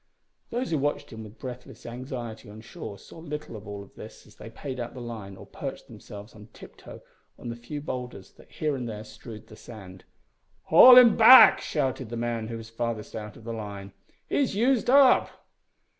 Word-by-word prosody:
Those 245 -2 -3
who 155 - 0
watched 145 +2 -3
him 110 0 -8
with 105 +1 -13
breathless 125 -1 -10
anxiety 120 -3 -8
on 105 +1 -12
shore 100 -2 -9
saw 165 - -15
little 150 -6 -7
of 105 -1 -11
all 100 -1 -8
this - - -12
as - - -20
they 115 - -10
paid 130 +3 -8
out 120 +1 -6
the - - -8
line 110 -5 -8
or - - -12
perched - - -8
themselves 105 +2 -12
on 105 -1 -14
tiptoe - - -14 0.3
on 120 - -8
the 115 - -5
few 120 +5 -8
boulders 125 -8 -7
that - - -20
here 150 -2 -2
and 125 -3 -5
there 105 -1 -7
strewed 110 0 -12
the 110 - -15
sand. 95 -6 -13 0.6
"Haul 250 +10 +8
him 245 -3 +8
back!" 250 +3 +9
shouted 130 -5 -3
the 120 - -6
man 115 -1 -3
who 115 0 -6
was 115 -1 -10
farthest 115 -2 -5
out 105 -1 -8
on 115 - -16
the 115 0 -6
line. 100 -3 -8 0.3
"He's 270 -8 -1
used 245 +2 +1
up!" 270 -1 +5
120 Hz, 195 wpm, -26 LUFS, 110-145 Hz, 0.6 s, back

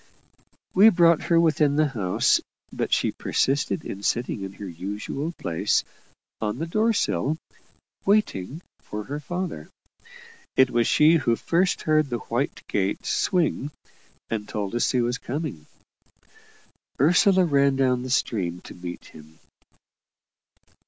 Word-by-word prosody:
We 205 +4 +8
brought 170 -4 +4
her 170 -1 +4
within 155 -3 +3
the 155 +1 +3
house, 100 -8 +1 0.3
but - - -3
she - - +2
persisted 140 +4 -1
in 100 - -6
sitting 120 0 -1
in 95 0 -6
her 100 - -8
usual 105 - -5
place, 80 - 0 0.6
on 105 -1 -2
the 165 - -3
door 215 +7 +1
sill, 155 -7 0 0.7
"waiting" 170 - 0 0.2
for 105 0 -6
her 145 +6 -5
father. 175 - -5 0.9
It 130 -1 +4
was 120 -1 +2
she 155 +2 +5
who 120 -6 +1
first 180 +8 0
heard 155 -2 +2
the 120 - -1 0.2
white - - -1
gate 95 0 -1
swing, 165 -5 0 0.6
and 105 -2 -4
told 100 -1 -3
us 120 - +1
he 125 - +1
was 120 +1 -1
coming. 130 - -5 1.3
Ursula 180 +5 +4
ran 140 -3 +3
down 130 -2 +2
to 125 - -6
the - - -5
stream 90 -8 -1
to - - -11
meet 90 0 -8
him. 80 +1 -15
135 Hz, 140 wpm, -24 LUFS, 105-165 Hz, 1.3 s, We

